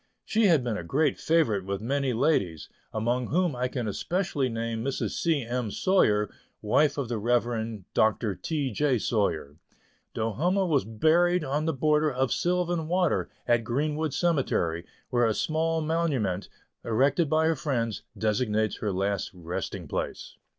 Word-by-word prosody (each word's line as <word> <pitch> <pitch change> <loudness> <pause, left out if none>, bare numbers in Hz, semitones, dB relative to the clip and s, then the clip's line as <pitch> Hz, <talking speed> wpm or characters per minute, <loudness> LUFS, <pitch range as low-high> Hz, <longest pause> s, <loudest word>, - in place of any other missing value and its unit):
She 220 -1 +3
had 160 -8 +4
been 115 -4 -1
a 85 - -5
great 140 - +1
favorite 140 - +2
with 100 +1 -3
many 135 +4 0
ladies, 110 - 0 0.2
among 120 +3 -1
whom 175 -3 +1
I 125 +1 0
can 125 -3 -3
especially 150 - -1
name 115 -1 -3
Mrs. 135 +1 -2
C. 160 -5 0
M. 120 -1 -2
Sawyer, 105 - +2 0.3
wife 145 +7 +2
of 140 -4 -2
the 115 -2 -2
Rev. 115 -2 0
Dr. 110 -1 +2
T. 145 - -2
J. 145 -4 +1
Sawyer. 80 -10 -1 0.6
Do 115 0 -1
humme 180 - +1
was 145 -5 +2
buried 165 +10 +3
on 145 +2 -1
the 160 - +2
border 150 +2 +2
of 130 -1 0
Sylvan 175 -2 0
Water, 180 -1 +1 0.2
at 120 -1 +3
Greenwood 150 +5 -1
Cemetery, 110 - 0 0.2
where 120 -2 +3
a 110 - 0
small 160 +1 0
monument, 145 - -1 0.3
erected 140 +7 +2
by 155 +1 +3
her 160 0 +2
friends, 120 -7 -2 0.2
designates 110 -1 0
her 105 - -2
last 100 +1 -1
resting 85 0 -5
place. - - -4
130 Hz, 155 wpm, -27 LUFS, 110-155 Hz, 0.6 s, had